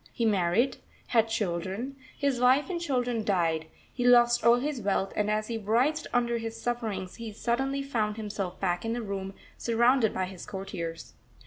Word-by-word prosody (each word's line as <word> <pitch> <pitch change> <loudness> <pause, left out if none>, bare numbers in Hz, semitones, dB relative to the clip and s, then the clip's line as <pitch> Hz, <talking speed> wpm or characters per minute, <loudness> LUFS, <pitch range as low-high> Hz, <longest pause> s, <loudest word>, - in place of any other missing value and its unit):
He 235 - -1
married, 205 +4 +2 0.3
had 225 -2 +3
children, 195 +6 -2 0.2
his 280 -4 0
wife 260 +8 +4
and 345 -2 -2
children 245 -7 0
died, 165 -6 +1 0.3
he 245 - -2
lost 240 -1 +5
all 235 0 +7
his 270 +1 -2
wealth, 195 -1 0
and 210 0 +1
as 215 0 0
he 230 -1 -3
writhed 250 +9 +1
under 235 -1 +1
his 225 0 -5
sufferings 220 -6 -3
he 230 -1 -6
suddenly 270 +6 -1
found 220 -6 -1
himself 205 -4 -4
back 175 -2 0
in 225 0 -1
the 240 0 -3
room, 195 -1 -4 0.2
surrounded 235 0 +3
by 185 - -1
his 185 0 -9
courtiers. 190 -5 -6
225 Hz, 175 wpm, -28 LUFS, 195-245 Hz, 0.3 s, all